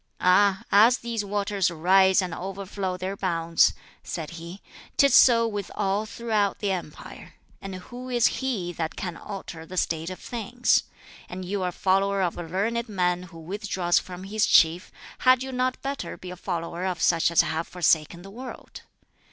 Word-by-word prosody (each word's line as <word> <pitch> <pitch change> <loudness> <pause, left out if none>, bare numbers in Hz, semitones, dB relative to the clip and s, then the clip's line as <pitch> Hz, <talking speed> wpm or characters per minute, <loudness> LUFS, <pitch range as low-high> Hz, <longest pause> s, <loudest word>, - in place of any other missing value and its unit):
"Ah, 190 +1 +4
as 225 +5 +6
these 230 -2 -3
waters 200 -1 0
rise 190 +3 +4
and 180 -2 -4
overflow 190 0 -4
their 185 +2 -4
bounds," 170 -3 +2 0.3
said 160 -3 -6
he, 170 +3 -9 0.4
"'tis 280 -2 +5
so 230 -3 +6
with 205 -3 -4
all 200 +3 0
throughout 215 -3 -1
the 205 -2 -1
empire; 175 -5 -7 0.3
and 195 -1 -6
who 245 +7 -9
is 240 -2 +2 0.2
he 205 -10 -2
that 160 -1 -4
can 175 -3 -5
alter 190 -5 -8
the 185 +3 -9
state 165 -1 -1
of 185 - -7
things? 245 +1 0 0.4
And 185 +1 -6
you 195 +2 -2
are 180 - 0
a - - -6
follower 195 +2 +1
of 175 - -1
a - - -5
learned 220 +8 -2
man 180 -3 0
who 165 - -13
withdraws 185 0 0
from 180 0 -9
his 210 +2 0
chief; 165 +2 +4 0.3
had 255 0 +4
you 265 - -6
not 255 0 -1
better 275 -10 -4
be 180 - -9
a - - -7
follower 170 -1 -4
of 185 -3 -2
such 165 0 +3
as 170 - +5
have 160 +1 -2
forsaken 170 -1 +1
the 195 - -11
world?" 250 +4 -9
190 Hz, 175 wpm, -25 LUFS, 175-210 Hz, 0.4 s, as